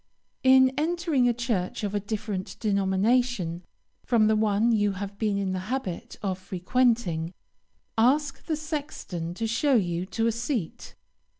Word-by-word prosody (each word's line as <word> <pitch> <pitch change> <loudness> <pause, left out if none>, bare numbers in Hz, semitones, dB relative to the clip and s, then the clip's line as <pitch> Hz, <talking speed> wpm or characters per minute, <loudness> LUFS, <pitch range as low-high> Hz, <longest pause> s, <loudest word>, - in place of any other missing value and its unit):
In 260 0 +6
entering 320 -6 +1
a - - +4
church 230 -6 -2
of 205 -1 -2
a 205 - +1
different 205 -2 -4
denomination 200 -2 +1 0.4
from 230 -3 +3
the 220 0 +4
one 215 +2 +2
you 205 -3 +2
have 200 +1 -6
been 210 -3 +1
in 195 -1 -1
the 185 +2 -4
habit 190 -10 -5
of 190 -2 -1
frequenting, 185 -3 0 0.6
ask 275 +4 +2
the 320 - 0
sexton 290 - -5
to 225 - -2
show 250 +5 +2
you 180 -4 0
to 225 +4 -1
a 230 - +3
seat. 235 - -4
215 Hz, 145 wpm, -27 LUFS, 190-250 Hz, 0.6 s, In